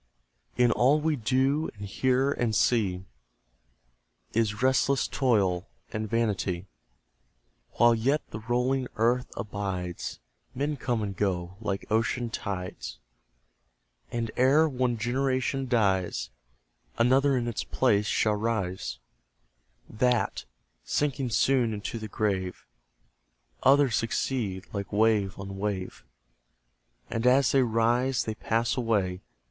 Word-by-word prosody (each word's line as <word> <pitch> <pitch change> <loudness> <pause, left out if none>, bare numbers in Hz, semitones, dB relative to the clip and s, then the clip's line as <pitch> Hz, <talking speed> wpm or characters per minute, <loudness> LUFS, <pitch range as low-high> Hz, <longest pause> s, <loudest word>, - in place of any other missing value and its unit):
In 125 -1 +4
all 135 +6 +4
we 155 0 +1
do, 135 +5 +1
and 100 - -6
hear, 130 +6 +1
and 120 -5 0
see, 95 -5 +1 1.3
Is 110 0 0
restless 130 0 +3
Toil 105 -8 +1 0.3
and 110 -1 -3
Vanity. 100 -5 -1 1.1
While 120 0 +5
yet 135 +7 0
the 105 - -5
rolling 125 +3 0
earth 120 +3 +2
abides, 100 -4 -4 0.4
Men 145 +3 -1
come 120 -4 -1
and 100 -1 -4
go 90 -3 -1
like 100 -3 -3
ocean 115 +2 0
tides; 95 -4 -5 1.1
And 115 -2 -2
ere 140 +5 +5
one 125 -4 0
generation 130 +3 0
dies, 95 - +1 0.7
Another 130 +3 +4
in 120 -1 -1
its 115 - -2
place 105 0 +1
shall 110 - +2
rise; 105 -4 -2 0.9
THAT, 125 +1 0 0.4
sinking 140 -3 -1
soon 120 -1 +2
into 105 +3 -5
the 110 - -6
grave, 95 -3 -2 1.0
Others 135 -3 +4
succeed, 110 -4 -2
like 100 -1 -4
wave 105 -3 +2
on 95 0 -7
wave; 100 -2 -3 1.1
And 115 +2 0
as 130 0 +5
they 135 - +4
rise, 120 +2 +2
they 110 - -3
pass 115 +2 0
away. 100 -7 0
115 Hz, 115 wpm, -28 LUFS, 100-130 Hz, 1.3 s, While